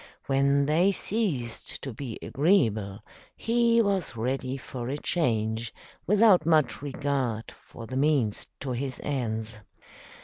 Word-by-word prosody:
When 140 +1 +2
they 170 +7 +3
ceased 185 - -2
to 135 - -5
be 120 -1 -6
agreeable, 115 - +1 0.3
he 235 0 +3
was 195 - -1
ready 130 +3 -2
for 125 -2 -6
a 140 - -2
change, 115 -8 -1 0.3
without 210 -2 +5
much 155 -6 +2
regard 135 -5 -2
for 115 - -12
the 130 +4 -5
means 135 -7 +1
to 135 - -3
his 130 +1 -3
ends. 110 -5 -2
135 Hz, 125 wpm, -27 LUFS, 115-160 Hz, 0.3 s, without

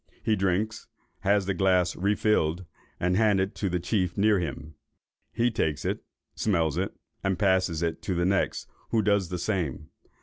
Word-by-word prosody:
He 110 -1 +2
drinks, 95 +3 -1 0.3
has 100 0 +2
the 100 - 0
glass 90 -1 +2
refilled, 95 -3 +1 0.3
and 90 +1 +1
handed 100 -2 +2
to 100 - -2
the 90 0 0
chief 90 0 -1
near 105 0 +4
him; 75 -2 -5 0.6
he 120 +1 +1
takes 80 -9 -1
it, - - -2 0.3
smells 85 -8 +1
it, 95 +3 -2 0.3
and 95 -2 0
passes 95 -4 +2
it 85 -1 -2
to 95 - -2
the 85 0 +1
next, 95 +1 0 0.2
who 110 -2 +2
does 100 -3 +2
the 90 - -3
same. 85 -6 -2
95 Hz, 165 wpm, -27 LUFS, 85-100 Hz, 0.6 s, near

